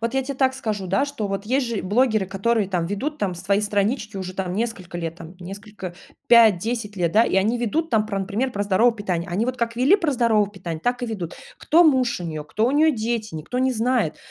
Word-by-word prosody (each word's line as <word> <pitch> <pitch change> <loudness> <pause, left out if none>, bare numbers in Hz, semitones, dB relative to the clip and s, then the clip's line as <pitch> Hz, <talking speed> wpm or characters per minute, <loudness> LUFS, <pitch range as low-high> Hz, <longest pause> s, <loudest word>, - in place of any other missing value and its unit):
Вот 230 +3 -2
я 270 - +2
те 275 +1 -5
так 265 0 +2
скажу, 215 -7 -3
да, 195 +10 +1
что 280 -7 -4
вот 195 +1 -4
есть 260 +3 +1
же 230 -4 -3
блогеры, 215 0 +2
которые 200 +2 0
там 180 -3 -1
ведут 270 - -3
там 190 -6 -1
свои 195 +4 0
странички 210 +1 -1
уже 185 -1 -6
там 185 -2 -3
несколько 195 -5 -3
лет, 165 -1 -4
там 165 +1 -11
несколько 195 0 -8 0.3
5-10 225 -1 +4
лет, 170 -3 0
да, 220 +2 +5
и 195 - 0
они 215 +5 +2
ведут 305 +8 -1
там 220 -3 +3
про, 200 -2 -2
например, 215 +7 -2
про 205 - -1
здоровое 205 +4 +3
питание. 180 -6 -3
Они 195 +6 0
вот 255 0 -2
как 230 -1 -2
вели 270 +11 +5
про 335 -7 0
здоровое 225 -5 +2
питание, 175 -5 -6
так 245 +1 0
и 245 - -1
ведут. 185 -7 -5 0.2
Кто 335 +3 +4
муж 260 - +3
у - - -5
неё, 155 -2 -5
кто 215 +9 0
у 250 - +2
неё 310 +2 +4
дети, 220 -3 -3
никто 160 +11 -4
не 260 0 +2
знает. 235 -7 0
215 Hz, 235 wpm, -23 LUFS, 190-245 Hz, 0.3 s, да